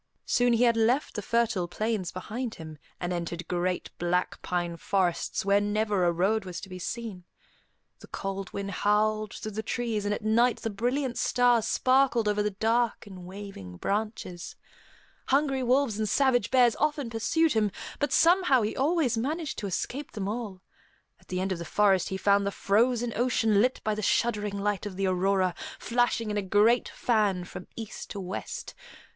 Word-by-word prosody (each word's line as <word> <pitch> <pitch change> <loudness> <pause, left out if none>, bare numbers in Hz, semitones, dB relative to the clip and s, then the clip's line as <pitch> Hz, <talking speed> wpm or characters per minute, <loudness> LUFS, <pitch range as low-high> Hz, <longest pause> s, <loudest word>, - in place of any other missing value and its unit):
Soon 245 -1 +3
he 235 +1 +3
had 235 -1 +4
left 235 +6 +2
the 210 - -3
fertile 225 -5 0
plains 210 0 -2
behind 225 +6 -5
him, 155 -2 -10 0.2
and 180 0 -2
entered 170 0 -4
great, 180 0 -2
black 175 +1 -1
pine 175 -1 -2
forests 180 +1 -1
where 200 +1 +4
never 205 -2 +1
a 175 - +4
road 195 +6 +1
was 180 -2 -6
to 195 - -10
be 185 0 -7
seen. 215 -2 -5 0.8
The - - -13
cold 195 -1 -5
wind 200 0 -4
howled 215 +2 +1
through 215 - -6
the 215 +2 -3
trees, 225 -2 -2
and 205 - -1
at 210 - -2
night 235 +3 +3
the 225 - -2
brilliant 245 +5 -1
stars 245 -3 +3
sparkled 255 -3 +3
over 210 0 +1
the 210 - +1
dark 225 +4 0
and 185 -3 -10
waving 185 - -9
branches. 205 - -3 0.7
Hungry 275 -1 +2
wolves 250 -3 +2
and 215 -1 0
savage 255 -5 +2
bears 250 -3 +4
often 295 -5 0
pursued 295 +8 +2
him, 215 -2 +2 0.3
but 290 - 0
somehow 330 - +4
he 210 - -2
always 275 -5 +1
managed 305 +5 -3
to 205 - -3
escape 260 - -4
them 200 -3 -3
all. 205 -4 -5 0.6
At - - -25
the 185 - -3
end 190 +1 -1
of 180 - -2
the - - -4
forest 195 +1 +2
he 190 - -3
found 200 0 +3
the - - +2
frozen 235 +4 +1
ocean 225 -4 +2
lit 255 +3 +1
by 215 - 0
the 215 - -3
shuddering 210 -2 0
light 205 0 -1
of 195 - -7
the 195 +1 -1
aurora, 185 0 +2 0.2
flashing 235 -2 0
in 210 - -2
a - - +1
great 210 +5 +3
fan 210 -6 +1
from 180 0 -9
east 225 -2 -7
to 200 - -6
west. 185 0 -6
210 Hz, 180 wpm, -28 LUFS, 190-240 Hz, 0.8 s, had